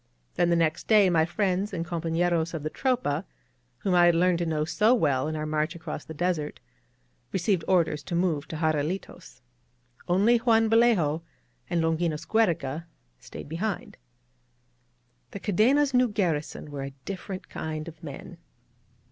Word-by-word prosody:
Then 175 - +2
the 170 - +3
next 165 -1 0
day 205 -4 +5
my 160 -2 +3
friends 195 +2 -1
and 170 -2 -2
compafLeros 170 -1 0
of 155 - -5
the 155 - -3
Tropa, 240 - 0 0.5
whom 185 +8 -1
I 175 -1 +6
had 170 - +4
learned 175 0 +3
to 170 - -1
know 155 -1 0
so 215 +8 +3
well 145 - +1
in 155 - -3
our 155 0 -3
march 155 +2 -1
across 160 -2 -6
the 160 - -9
desert, 170 -3 -2 0.7
received 185 -2 0
orders 170 -5 +2
to 170 - -3
move 165 -5 0
to - - -6
Jarralitos. 155 -1 -3 0.7
Only 200 +7 +4
Juan 225 -2 +3
Vallejo 215 -10 +3 0.5
and 170 -2 +1
Longinos 165 -1 -1
Giiereca 165 -7 0 0.3
stayed 60 - -10
behind. 180 +7 -4 1.3
The 200 - -7
Cadena's 260 +9 +3
new 250 0 +4
garrison 165 -8 -2
were 140 -1 -5
a 135 0 -7
difi^erent 190 -1 -6
kind 155 0 -5
of 160 -1 -11
men. 145 -4 -9
170 Hz, 155 wpm, -27 LUFS, 155-195 Hz, 1.3 s, I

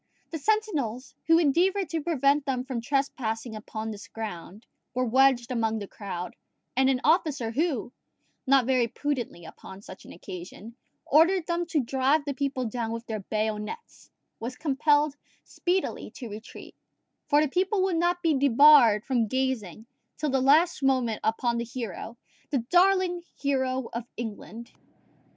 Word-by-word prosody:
The 320 - -4
sentinels, 285 - -1
who 330 0 +6
endeavoured 355 +5 +2
to 320 +1 -2
prevent 285 -2 +1
them 255 -2 -1
from 255 -3 -4
trespassing 240 -4 -2
upon 220 +1 -6
this 205 -1 -9
ground, 210 -1 -8 0.3
were 255 0 +1
wedged 255 0 +3
among 225 -2 0
the 205 -2 -6
crowd; 180 -4 -6 0.4
and 265 +1 +3
an 260 -2 +2
officer 295 - +2
who, 265 -3 -1 0.5
not 270 -2 +5
very 255 -2 +2
prudently 240 - -4
upon 190 +4 -12
such 185 - -11
an - - -13
occasion, 185 +5 -10 0.3
ordered 330 +4 +4
them 345 0 -2
to 315 -3 +1
drive 270 +4 +1
the 285 - -2
people 275 -2 -2
down 230 0 -3
with 230 +1 -5
their 220 -2 -4
bayonets, 215 - -4 0.3
was 240 +3 -5
compelled 295 0 +1 0.3
speedily 360 +1 -2
to 245 - -7
retreat; 215 +2 -10 0.5
for 290 - +4
the 305 - +3
people 375 +6 +1
would 375 -3 +1
not 350 +1 0
be 325 -2 +3
debarred 270 -5 +6
from 240 -4 +1
gazing 230 -5 -2 0.3
till 300 -2 -1
the 265 -1 +1
last 310 +7 +4
moment 255 -5 +1
upon 235 +1 0
the - - -1
hero 235 -1 -6 0.3
the 285 - 0
darling 365 -1 +3 0.2
hero 260 -3 -1
of 235 0 -4
England! 235 +1 -7
260 Hz, 150 wpm, -27 LUFS, 225-300 Hz, 0.5 s, who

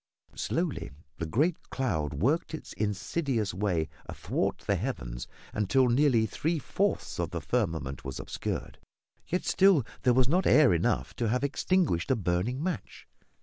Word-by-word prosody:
Slowly - - -2 0.3
the 85 - -2
great 155 - 0
cloud 80 - -1
worked 150 - +1
its - - -9
insidious 110 - -1
way 90 -5 0 0.2
athwart - - -1
the - - +2
heavens - - -4 0.3
until 115 +6 +3
nearly 120 -3 +4
three 160 +10 -1
fourths 145 - -1
of - - 0
the - - -3
firmament 80 - -2
was 65 -2 -5
obscured, - - -4 0.5
yet 180 - -1
still 190 - +5 0.2
there 125 -1 +3
was 130 -1 +4
not 180 +7 +2
air 150 -10 +6
enough 70 -6 0
to 115 - 0
have 125 +4 0
extinguished 145 - +1
a 130 - +4
burning 105 - -1
match. 180 -3 -4
120 Hz, 145 wpm, -29 LUFS, 90-145 Hz, 0.5 s, air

